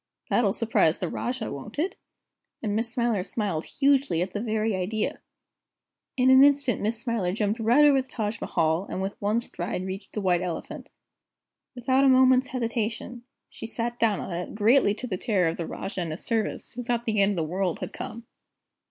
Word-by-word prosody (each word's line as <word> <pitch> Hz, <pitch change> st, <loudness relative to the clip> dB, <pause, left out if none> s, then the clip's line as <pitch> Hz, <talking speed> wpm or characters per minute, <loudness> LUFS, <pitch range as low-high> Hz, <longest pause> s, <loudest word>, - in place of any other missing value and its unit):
That'll 225 Hz, -5 st, +3 dB
surprise 215 Hz, -7 st, +2 dB
the 180 Hz, -, -3 dB
Rajah, 245 Hz, -2 st, -3 dB
won't 175 Hz, -, -8 dB
it?" 340 Hz, +6 st, -1 dB, 0.7 s
and 205 Hz, -2 st, -1 dB
Miss 230 Hz, +1 st, -1 dB
Smiler 235 Hz, -4 st, 0 dB
smiled 195 Hz, -6 st, -2 dB
hugely 275 Hz, -, +2 dB
at 185 Hz, +1 st, -7 dB
the 205 Hz, -, -2 dB
very 220 Hz, -2 st, 0 dB
idea. 210 Hz, +4 st, -2 dB, 1.0 s
In 255 Hz, 0 st, +5 dB
an 260 Hz, +1 st, +8 dB
instant 280 Hz, -4 st, +3 dB
Miss 220 Hz, +2 st, -1 dB
Smiler 230 Hz, -6 st, -1 dB
jumped 210 Hz, +3 st, -1 dB
right 240 Hz, +7 st, +5 dB
over 280 Hz, -2 st, +5 dB
the 260 Hz, -, -14 dB
Taj 215 Hz, -3 st, -3 dB
Mahal, 165 Hz, +2 st, 0 dB
and -, -, -4 dB
with 195 Hz, +1 st, -2 dB
one 210 Hz, +3 st, +1 dB
stride 180 Hz, -3 st, -4 dB
reached 190 Hz, +1 st, -7 dB
the 210 Hz, -, -2 dB
White 180 Hz, -2 st, +2 dB
Elephant. 180 Hz, -2 st, -5 dB, 0.9 s
Without 260 Hz, +2 st, +2 dB
a 275 Hz, -, +6 dB
moment's 260 Hz, 0 st, +5 dB
hesitation, 235 Hz, 0 st, -3 dB, 0.2 s
she -, -, -8 dB
sat 235 Hz, +1 st, -4 dB
down 220 Hz, -4 st, +2 dB
on 180 Hz, -, -5 dB
it, 175 Hz, +3 st, -5 dB
greatly 215 Hz, 0 st, +4 dB
to 250 Hz, -, -6 dB
the 190 Hz, -7 st, -3 dB
terror 190 Hz, -5 st, +1 dB
of 165 Hz, -, -4 dB
the 170 Hz, -, -4 dB
Rajah 195 Hz, -, -4 dB
and 170 Hz, -, -3 dB
his 155 Hz, -, -6 dB
servants, 225 Hz, -2 st, -1 dB
who 245 Hz, -, -6 dB
thought 240 Hz, -1 st, -1 dB
the 215 Hz, -3 st, +1 dB
end 200 Hz, +1 st, +3 dB
of 165 Hz, -4 st, -1 dB
the 155 Hz, -, -8 dB
world 185 Hz, -3 st, 0 dB
had -, -, -6 dB
come. 230 Hz, +1 st, -7 dB
220 Hz, 195 wpm, -26 LUFS, 190-245 Hz, 1.0 s, an